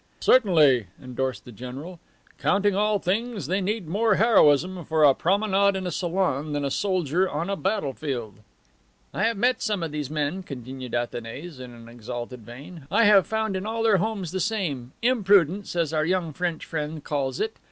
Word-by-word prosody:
"Certainly," 155 - +4
endorsed 130 0 -4
the 125 - -10
general. 130 - -8 0.4
"Counting 205 -1 +2
all 210 +1 +2
things, 205 - -2
they 190 +7 0
need 205 -1 -2
more 210 +5 +2
heroism 185 - +4
for 160 0 +1
a 140 -2 +7
promenade 200 +3 +2
in 190 -1 -3
a 180 - -2
salon 165 -5 -1
than 145 -1 -1
a 140 - -2
soldier 185 -1 0
on 165 +6 -3
a - - 0
battle 195 -8 -1
field." 120 -9 -5 0.7
"I - - -3
have 230 -2 0
met 245 +2 +1
some 205 -5 -1
of 160 - -3
these 150 -3 -4
men," 155 +4 -2
continued 130 -5 -7
Athanase 120 +6 -5
in 120 -2 -11
exalted 120 +1 -7
vein. 135 - -11
"I 210 +6 +3
have 205 -3 +6
found 220 -2 -1
in 190 +2 -3
all 225 +1 -2
their 220 -3 +4
homes 195 -3 -2
the 190 - -2
same 170 - -2
imprudence, 200 - +3
as 165 -3 0
our 155 -1 +1
young 170 -1 -1
French 175 0 -3
friend 155 -1 -4
calls 135 -3 -2
it. 220 0 -2
170 Hz, 180 wpm, -25 LUFS, 140-200 Hz, 0.7 s, a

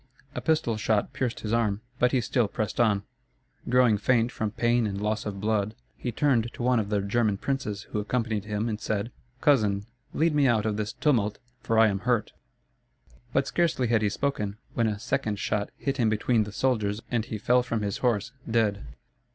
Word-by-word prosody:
A - - -4
pistol 155 -9 +1
shot 110 -1 0
pierced 125 -3 -2
his 110 0 -3
arm; 105 -3 +1 0.2
but 125 0 +4
he 130 - +2
still 120 0 +1
pressed 105 +1 -3
on. 105 -4 +3 0.7
Growing 125 -4 +4
faint 120 +1 +2
from 110 -3 -2
pain 120 +1 +1
and 100 -1 -3
loss 105 +1 -1
of 100 -2 -5
blood, 105 0 0 0.2
he 120 - -4
turned 120 -2 +1
to - - -6
one 125 -1 +3
of 105 -2 -2
the 105 -1 +1
German 105 0 +1
princes 110 -5 -3
who 105 - -1
accompanied 110 -1 -1
him 105 +1 -2
and 110 -1 -3
said: 105 +2 -2 0.3
"Cousin, 105 -8 +3 0.3
lead 165 0 +2
me 145 -2 +4
out 110 -3 +2
of 110 -1 0
this 105 +1 -3
tumult; 110 -8 +1 0.2
for 115 -2 0
I 110 0 +7
am 100 -2 0
hurt." 120 0 0 1.0
But - - +2
scarcely 155 -8 +1
had 115 -2 +3
he 105 - +2
spoken, 105 -3 -2 0.2
when 115 -1 +1
a 105 -2 -1
second 105 0 -1
shot 100 0 -1
hit 135 -1 -2
him 115 -4 +3
between 110 +1 +2
the 105 - -7
shoulders 110 -3 0
and 120 -2 +1
he 110 -2 -4
fell 125 +4 +3
from 115 -3 -2
his 100 -1 -2
horse, 120 -2 0 0.2
dead. 110 -3 +1
110 Hz, 200 wpm, -27 LUFS, 105-120 Hz, 1.0 s, I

